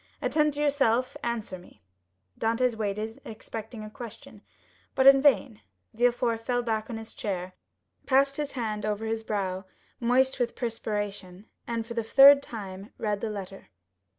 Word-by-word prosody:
Attend 300 -2 +1
to - - -5
yourself; 265 -4 +2
answer 225 -6 -3
me." 175 - -19 0.6
Dantès 230 +2 +1
waited, 215 +1 -3
expecting 220 0 -8
a 215 - -7
question, 235 -1 -10 0.5
but 265 - +3
in 270 0 +8
vain. 210 - +3 0.3
Villefort 240 0 +1
fell 245 0 0
back 220 -1 -2
on 230 - -4
his 225 0 -9
chair, 185 -3 -4 0.5
passed 275 0 +3
his 295 -1 -3
hand 215 -4 -3
over 210 +1 -2
his 220 0 -2
brow, 195 -4 -2 0.4
moist 260 +2 +2
with 245 -1 -1
perspiration, 205 -5 -4 0.2
and, 230 -1 -2
for 235 - -7
the 230 -1 -1
third 275 +5 +8
time, 200 -5 -8
read 210 -2 -2
the 225 - -2
letter. 195 -2 -7
225 Hz, 150 wpm, -27 LUFS, 210-250 Hz, 0.6 s, in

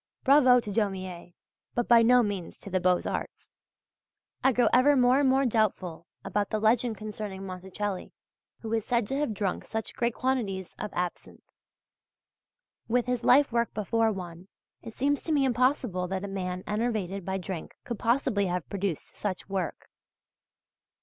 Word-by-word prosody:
Bravo 260 -3 +6
to 210 -3 -5
Daumier, 185 -4 -3 0.4
but 240 - 0
by 235 -1 +7
no 245 +2 +5
means 200 -5 -4
to 200 - -9
the 185 - +2
Beaux 180 0 +3
Arts! - - -5 0.9
I 265 - +5
grow 245 0 +3
ever 280 +4 +6
more 250 +1 +4
and 280 -2 +3
more 270 +1 +3
doubtful 185 -7 0 0.2
about 205 -1 -1
the 215 - 0
legend 225 +1 +2
concerning 210 -2 -6
Monticelli, 190 +1 -5 0.5
who 225 -1 -4
is 225 -1 +1
said 235 -1 +1
to 270 - -1
have 290 -8 -1
drunk 195 -2 -2
such 220 -2 -5
great 235 -1 -1
quantities 215 -8 -2
of - - -3
absinthe. 180 -1 -5 1.3
With 245 +1 +1
his 250 -1 -1
life 275 +2 +5
work 235 0 0
before 220 +2 +1
one, 180 -2 -7 0.3
it 225 -2 -10
seems 285 +2 +1
to 325 - -2
me 285 -3 +3
impossible 250 -7 +1
that 190 +1 -3
a - - -3
man 185 -2 -4
enervated 210 -3 -2
by 190 +2 -2
drink 185 -3 -6
could 235 -3 -5
possibly 230 -5 +1
have 180 -2 -2
produced 195 -5 -3
such 195 -3 -4
work. 190 -5 -3
215 Hz, 165 wpm, -28 LUFS, 190-245 Hz, 1.3 s, by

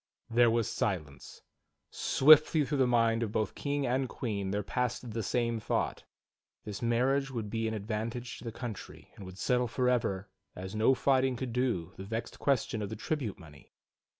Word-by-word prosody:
There 120 0 +5
was 115 -1 +1
silence. 75 -9 -4 0.5
Swiftly 155 +1 +5
through 140 +1 -1
the 130 - +4
mind 115 -1 +3
of 110 -3 -1
both 110 -2 -1
King 145 -1 -2
and 130 +1 0
Queen 100 -5 -3
there 105 +1 -1
passed 125 +2 -2
the 115 +1 -2
same 115 +2 0
thought: - - -2 0.6
"This 105 -2 -6
marriage 130 +4 +2
would 115 -6 -4
be 115 0 -1
an 110 - -2
advantage 115 +3 -4
to - - -12
the 115 - -3
country, 115 -3 -8
and 95 - -10
would 95 0 -10
settle 125 +3 +1
forever, 115 -5 0 0.3
as 95 +2 -7
no 110 +5 +4
fighting 130 -1 +2
could 125 -1 -4
do, 115 -9 -1
the 95 - -6
vexed 115 +3 -5
question 135 -4 0
of 100 - -3
the 110 - -5
tribute 115 -3 -3
money." 75 -4 -16
115 Hz, 180 wpm, -31 LUFS, 105-125 Hz, 0.6 s, There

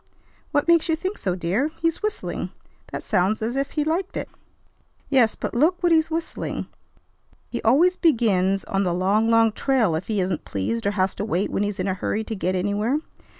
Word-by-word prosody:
"What 290 - +1
makes 335 -1 +4
you 320 - +3
think 375 +5 -4
so, 185 -3 -1
dear? 185 - 0
He's 330 0 -1
whistling. 425 0 -3 0.4
That - - -5
sounds 195 +2 +1
as 235 +3 -2
if 275 0 -2
he 300 - +1
liked 340 +5 -1
it." - - -4 0.8
"Yes, 250 -5 +4
but - - -4
look 340 +9 +2
what 345 - +4
he's 320 -1 +4
whistling. 330 0 -3 0.9
He - - -3
always 330 +11 +4
begins 195 - +2
on 195 - -1
'The 175 -2 0
Long, 200 +5 +2
Long 230 -1 +5
Trail' 235 -6 +1
if 160 +4 -3
he 215 -2 0
isn't 180 -3 -1
pleased 110 - -2
or - - +2
has 185 0 +2
to - - -4
wait 200 -2 -1
when - - 0
he's 205 -1 -2
in 185 - -1
a 190 - +1
hurry 205 +3 -2
to 220 - -5
get 185 -1 -1
anywhere. 205 +8 0
220 Hz, 200 wpm, -23 LUFS, 190-305 Hz, 0.9 s, Long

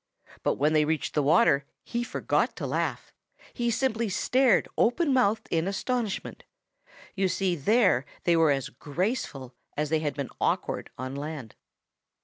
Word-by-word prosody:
But - - +1
when 150 +3 +2
they 155 -1 +4
reached 155 +1 -1
the 150 - +2
water 145 0 +4 0.2
he 235 0 -2
forgot - - 0
to - - -4
laugh. - - -2 0.4
He 240 -1 -1
simply 235 -2 0
stared 250 +3 +3
open 280 +5 +2
mouthed 225 -4 +2
in 165 +1 +1
astonishment. 220 +2 -2 0.7
You 195 -1 +1
see 185 -1 0
there 185 - +3 0.2
they 175 - +3
were 165 -2 +4
as 135 -2 0
graceful 145 - -3 0.2
as 150 0 -1
they 160 - +3
had 150 -2 -2
been 140 -3 -4
awkward - - -1
on 130 +1 -5
land. 140 -5 -6
175 Hz, 150 wpm, -27 LUFS, 145-230 Hz, 0.7 s, they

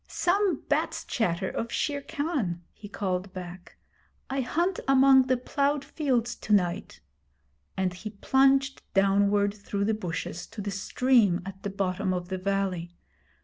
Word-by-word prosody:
'Some 390 +2 +1
bat's - - 0
chatter 190 -4 -1
of 230 +4 -4
Shere 285 -2 -1
Khan,' 275 - -2
he 205 - -11
called 190 -2 -2
back. 180 0 -9 0.5
'I 270 0 0
hunt 340 +9 0
among 265 -1 +6
the 255 -1 +2
ploughed 280 +3 0
fields 245 -6 0
to - - -7
night'; 180 -4 0 0.8
and 185 -1 0
he 200 +4 -7
plunged 270 +5 +2
downward 200 +1 +3
through 200 -1 -3
the 220 - +2
bushes, 175 -3 -4
to 225 - -11
the 205 0 -3
stream 205 -1 +2
at 195 0 -8
the 200 - -3
bottom 190 -1 -1
of 175 0 -5
the 190 -1 -3
valley. 185 -3 -2
205 Hz, 145 wpm, -27 LUFS, 185-265 Hz, 0.8 s, among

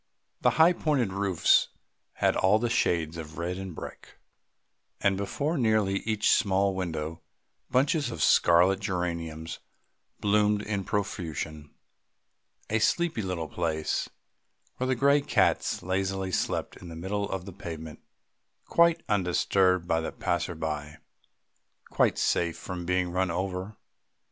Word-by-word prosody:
The - - +5
high 165 +3 +7
pointed 135 - 0
roofs 100 -3 +3 0.5
had - - +1
all 95 +3 +4
the 120 +1 -1
shades 85 -7 +1
of 80 -1 -8
red 90 +2 -3
and 95 -3 -7
brick, - - -10 0.8
and 100 -1 +2
before 140 - -2
nearly 110 -4 +2
each 110 -1 +1
small 100 -1 +2
window 80 -3 -4 0.5
bunches 140 +1 +2
of - - -2
scarlet 90 +3 +5
geraniums 85 -5 -3 0.6
bloomed 105 0 +2
in 100 -3 -3
profusion, 80 -6 -4 0.9
a 110 - +1
sleepy 160 +5 +1
little 90 -4 -3
place, 80 -3 -2 0.7
where 130 - -1
the 130 - +1
grey 140 +3 +4
cats - - +1
lazily 95 +1 -1
slept - - -2
in 90 - -11
the 80 - -8
middle 100 +4 -3
of 95 -1 -4
the 100 - -8
pavement 80 -5 -8 0.7
quite 170 0 +3
undisturbed 90 -1 +2
by 80 -1 +2
any 80 - -3
passer 85 -1 -2
by, 75 -1 -4 0.9
quite - - +2
safe 85 -1 +1
from 90 -2 -6
being 90 -1 +1
run 95 +1 0
over. 95 +3 -3
95 Hz, 130 wpm, -28 LUFS, 85-105 Hz, 0.9 s, high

